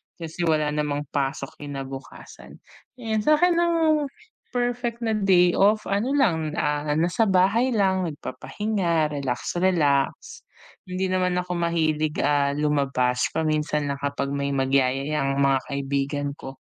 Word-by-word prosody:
kasi 165 +1 -4
wala 155 -2 +2
namang 150 -1 -1
pasok 135 -1 -3
kinabukasan. 135 -2 -9 0.4
And 225 -3 -2
sa'kin 305 +8 +3
ang 325 -3 +2 0.5
perfect 245 -1 -2
na 225 - 0
day 190 -4 +4
off 210 +2 +4
ano 225 +8 0
lang, 165 - +1
ah, 150 -2 -1
nasa 175 +8 +1
bahay 200 +7 +3
lang 190 -3 +2
nagpapahinga 170 +1 -2
relax, 140 +3 -3
relax. 150 -7 +1 0.5
Hindi 185 +1 -2
naman 180 -1 +1
ako 180 0 -2
mahilig, 155 -3 0
ah, 140 -1 +2
lumabas 140 -4 +1
paminsan 150 -2 0
lang 140 - -5
kapag 140 -1 -2
may 140 0 -2
magyayaya 135 +2 +1
ang 135 0 0
mga 135 -1 +3
kaibigan 140 0 -2
ko, 135 0 -8
155 Hz, 130 wpm, -24 LUFS, 140-195 Hz, 0.5 s, day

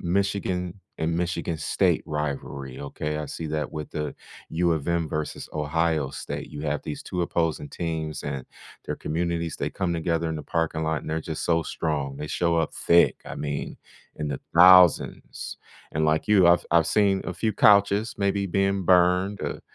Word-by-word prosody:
Michigan 95 0 -1 0.2
and 80 +1 -1
Michigan 85 -1 -2
State 75 - +1
rivalry, 70 -3 -4
okay? 75 +2 -4
I 75 - -4
see 80 +3 -5
that 75 -1 -3
with 75 -2 -6
the 75 -1 -4 0.4
U 85 +1 +1
of 80 -3 -2
M 85 -2 0
versus 75 0 -4
Ohio 75 -1 0
State, - - -6
you 75 - -7
have 75 -1 -1
these 75 - -6
two 90 - -4
opposing 80 -4 -1
teams, 80 -2 -4
and 70 -3 -4 0.4
their - - -3
communities, 85 0 -2
they - - -2
come 95 -3 -2
together 85 0 0
in 80 - -3
the 75 - -6
parking 80 -1 -1
lot, 80 -1 0
and - - -7
they're 80 +1 -1
just 80 0 -5
so 85 -1 +2
strong, 70 -4 -2
they 75 +1 -6
show 85 +1 +1
up 80 - 0
thick, 85 0 +4
I - - -7
mean, 70 -1 -4 0.4
in 75 -1 -4
the 70 - -3 0.2
thousands. 90 -1 +5 0.3
And 80 +1 0
like 80 +5 +1
you, 100 -4 +6
I've 85 0 +5
I've 85 -2 +4
seen 100 -2 +2
a 90 - -4
few 110 +4 -1
couches 100 +2 +4
maybe 100 0 0
being 95 0 0
burned, 90 +2 +3
uh, - - -2
a - - -17
85 Hz, 185 wpm, -25 LUFS, 75-90 Hz, 0.4 s, you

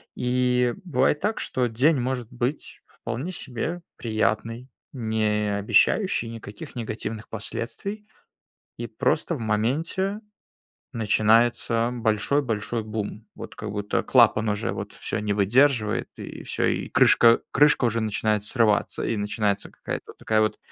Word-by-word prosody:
И 125 -1 +1
бывает 150 -3 +1
так, 210 +3 -1
что 125 -1 0
день 135 +7 +3
может 125 -2 -3
быть 125 +4 -4
вполне 125 +10 -5
себе 165 +4 -4 0.2
приятный, 115 +2 -1 0.2
не 110 -3 0
обещающий 120 - +2
никаких 110 0 -9
негативных 110 -1 -5
последствий. 130 - -4 0.7
И - - -5
просто 170 - 0
в 130 - -6
моменте 150 - -1 0.7
начинается 115 +1 +2
большой-большой 115 -1 0
бум. 110 0 -5
Вот - - -9
как 105 -1 -6
будто 105 0 -1
клапан 115 -3 +4
уже 105 - -1
вот - - -6
всё - - -4
не 105 -1 -1
выдерживает 110 +2 +2
и - - -8
всё, - - -1
и - - -1
крышка 115 0 +6
крышка 145 -3 +4
уже 115 0 0
начинает 105 -1 0
срываться, 110 -2 +1
и 115 - -1
начинается 105 -1 -1
какая-то - - -6
такая 110 0 +2
вот 110 - 0
115 Hz, 125 wpm, -25 LUFS, 110-130 Hz, 0.7 s, крышка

